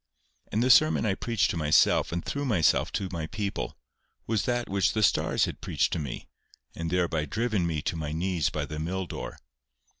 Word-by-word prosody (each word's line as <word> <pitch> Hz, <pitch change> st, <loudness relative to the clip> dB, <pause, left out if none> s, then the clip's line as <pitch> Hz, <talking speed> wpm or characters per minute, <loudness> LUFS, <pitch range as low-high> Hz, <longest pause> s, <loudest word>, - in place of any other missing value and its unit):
And 110 Hz, -, +1 dB
the 130 Hz, -, +5 dB
sermon 155 Hz, -1 st, +5 dB
I 100 Hz, -, +2 dB
preached 115 Hz, 0 st, 0 dB
to -, -, -3 dB
myself 75 Hz, -2 st, +3 dB
and 85 Hz, 0 st, -3 dB
through 140 Hz, 0 st, -2 dB
myself 95 Hz, -, +2 dB
to 95 Hz, -, -1 dB
my 80 Hz, -3 st, -4 dB
people, 105 Hz, -1 st, -4 dB, 0.5 s
was 110 Hz, -2 st, 0 dB
that 120 Hz, -1 st, -1 dB
which 100 Hz, 0 st, +1 dB
the 110 Hz, -, +1 dB
stars 90 Hz, -, +3 dB
had -, -, -7 dB
preached -, -, 0 dB
to -, -, -1 dB
me, 70 Hz, -5 st, -6 dB, 0.5 s
and 85 Hz, 0 st, -3 dB
thereby 85 Hz, -3 st, 0 dB
driven 110 Hz, -, 0 dB
me 80 Hz, -2 st, -2 dB
to -, -, -1 dB
my 75 Hz, -2 st, -4 dB
knees 85 Hz, -1 st, 0 dB
by -, -, -3 dB
the 75 Hz, 0 st, -6 dB
mill 90 Hz, +4 st, -2 dB
door. -, -, -7 dB
90 Hz, 200 wpm, -27 LUFS, 80-110 Hz, 0.5 s, the